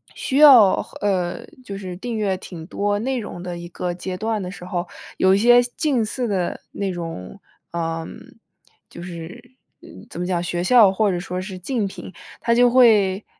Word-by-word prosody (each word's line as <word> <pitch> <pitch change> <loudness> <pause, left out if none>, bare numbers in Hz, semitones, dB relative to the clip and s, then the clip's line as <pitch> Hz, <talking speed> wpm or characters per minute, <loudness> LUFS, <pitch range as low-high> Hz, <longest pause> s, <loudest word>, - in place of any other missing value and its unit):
需 270 - -2
要 260 -10 +7
和 - - -14
呃， 185 -4 -1 0.2
就 200 -5 -7
是 185 -2 -7
订 230 +3 -4
阅 200 -3 0
挺 170 -3 -10
多 205 +1 -1
内 260 +4 -2
容 205 -5 -7
的 180 -1 -5
一 170 0 -8
个 175 0 -4
阶 185 +1 -6
段 220 +1 -2
的 180 - -6
时 180 -2 -10
候。 175 -1 -3 0.3
有 190 0 +4
一 - - +2
些 240 +3 +6
近 250 0 -1
似 245 +3 -3
的 185 -4 -2
那 200 -1 -3
种， 165 - -7 0.3
嗯， 165 -1 -4 0.7
就 170 - -10
是， 180 +9 -10 0.3
呃， - - -14 0.2
怎 - - -7
么 - - -2
讲， 180 -2 0
学 175 0 -2
校 225 0 +6
或 205 +1 +1
者 175 - -2
说 180 +1 -5
是 185 -1 -7
竞 225 +3 -2
品， 190 - -10 0.3
它 235 - +2
就 245 +1 +5
会 215 -6 +4
195 Hz, 205 characters per minute, -21 LUFS, 175-230 Hz, 0.7 s, 要